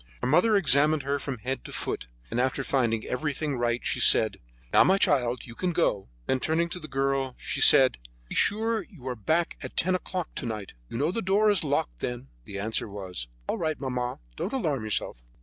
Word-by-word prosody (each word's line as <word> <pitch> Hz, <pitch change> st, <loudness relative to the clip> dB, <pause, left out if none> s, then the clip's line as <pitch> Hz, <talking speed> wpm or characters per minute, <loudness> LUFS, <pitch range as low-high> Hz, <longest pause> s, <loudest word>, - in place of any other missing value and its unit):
Her -, -, 0 dB
mother 180 Hz, -, +4 dB
examined 155 Hz, -3 st, +3 dB
her 140 Hz, +1 st, -1 dB
from 135 Hz, -2 st, -4 dB
head 130 Hz, +5 st, -4 dB
to -, -, -10 dB
foot, -, -, -4 dB, 0.2 s
and, 115 Hz, -, -1 dB
after 130 Hz, +1 st, 0 dB
finding 120 Hz, -5 st, 0 dB
everything 145 Hz, +1 st, -2 dB
right, 120 Hz, 0 st, -1 dB
she -, -, 0 dB
said: -, -, +5 dB, 0.3 s
"Now, -, -, +8 dB
my 190 Hz, +1 st, +4 dB
children, 125 Hz, -9 st, +2 dB
you 120 Hz, -, -10 dB
can 180 Hz, +7 st, -2 dB
go." 105 Hz, -, 0 dB, 0.2 s
Then 130 Hz, -, +1 dB
turning 165 Hz, +4 st, 0 dB
to 180 Hz, -, -5 dB
the 155 Hz, -, -8 dB
girl, 135 Hz, -2 st, -1 dB
she -, -, -3 dB
said: 130 Hz, -, +7 dB, 0.3 s
"Be -, -, -7 dB
sure 220 Hz, +1 st, +2 dB
you 155 Hz, -, -13 dB
are 125 Hz, -, -2 dB
back 160 Hz, -, 0 dB
by -, -, -4 dB
ten 185 Hz, -, +2 dB
o'clock 185 Hz, -2 st, -3 dB
to -, -, -3 dB
night; 105 Hz, -3 st, -5 dB, 0.2 s
you -, -, -5 dB
know 150 Hz, +6 st, +1 dB
the 230 Hz, -, -2 dB
door 205 Hz, +2 st, +3 dB
is 200 Hz, -5 st, +1 dB
locked 135 Hz, -, -1 dB
then." 125 Hz, +1 st, -4 dB, 0.2 s
The 100 Hz, -, -7 dB
answer 110 Hz, +2 st, -2 dB
was: 95 Hz, -10 st, -5 dB, 0.2 s
"All -, -, -2 dB
right, 155 Hz, -2 st, -1 dB
mamma; 125 Hz, -2 st, -3 dB, 0.2 s
don't 210 Hz, -, -4 dB
alarm 150 Hz, -, -1 dB
yourself." 105 Hz, -, -2 dB
135 Hz, 210 wpm, -27 LUFS, 120-170 Hz, 0.3 s, Now